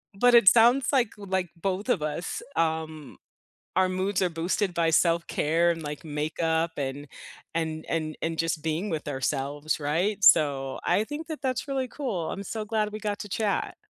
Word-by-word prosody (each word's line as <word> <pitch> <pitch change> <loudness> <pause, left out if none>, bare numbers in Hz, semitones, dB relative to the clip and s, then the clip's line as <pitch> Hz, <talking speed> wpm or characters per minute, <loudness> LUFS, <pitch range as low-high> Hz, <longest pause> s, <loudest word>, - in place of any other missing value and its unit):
But 245 +4 +5
it 235 -5 +6
sounds, 240 +5 +6
like, 245 -5 +2
like, 190 -3 -2
both 195 +6 -3
of 190 -11 +2
us, 155 +3 -3
um, 160 -3 -2 0.6
our 185 0 +3
moods 185 +1 -1
are 180 - +3
boosted 180 +4 -1
by 165 -1 +2
self-care 170 0 +2
and, 165 -1 -2
like, 150 0 -6
makeup 160 +2 -1
and 140 +1 -4 0.5
and 160 -1 -2
and 155 -2 -2
and 165 0 -2
just 165 -2 -1
being 160 +6 -2
with 155 -2 -3
ourselves, 145 +2 -2
right? 180 +8 0
So 140 -7 +4
I 210 - +2
think 295 +6 -6
that 315 -3 -6
that's 255 0 -1
really 270 -2 -2
cool. 230 - -3
I'm 200 - -5
so 215 +2 -4
glad 215 -1 -1
we 215 - -6
got 205 -1 -2
to 205 - -6
chat. 210 +1 -1
170 Hz, 175 wpm, -27 LUFS, 155-210 Hz, 0.6 s, it